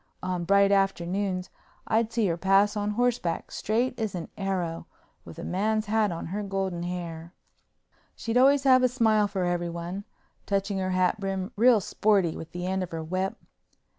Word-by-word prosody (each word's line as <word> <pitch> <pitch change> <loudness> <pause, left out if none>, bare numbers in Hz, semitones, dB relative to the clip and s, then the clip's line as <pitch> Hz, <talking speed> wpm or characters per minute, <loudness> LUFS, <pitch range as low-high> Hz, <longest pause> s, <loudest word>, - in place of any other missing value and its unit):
On 180 -2 -2
bright 200 +2 +4
afternoons 195 -1 0 0.3
I'd 225 0 +1
see 230 -2 +1
her 170 -3 +1
pass 195 +4 +3
on 205 0 -1
horseback, 230 -6 -1
straight 240 +4 -1
as 215 -4 -2
an 170 -2 -5
arrow, 180 -4 -3 0.4
with - - -11
a 170 - -6
man's 215 +4 0
hat 215 -1 +1
on 165 - -5
her 210 - -2
golden 195 -3 -2
hair. 170 -1 -6 0.8
She'd 230 0 -4
always 270 +2 +5
have 260 -2 +6
a 255 - +5
smile 220 -4 +2
for 195 -2 -2
everyone, 175 +2 -3 0.4
touching 195 0 0
her 185 0 -1
hat 185 +3 +1
brim 195 +1 -3
real 235 +1 +5
sporty 195 -3 +1
with 160 - -8
the 175 0 -5
end 190 +1 -1
of 180 - -3
her 165 -1 -5
whip. 185 +6 -2
195 Hz, 170 wpm, -27 LUFS, 180-215 Hz, 0.8 s, have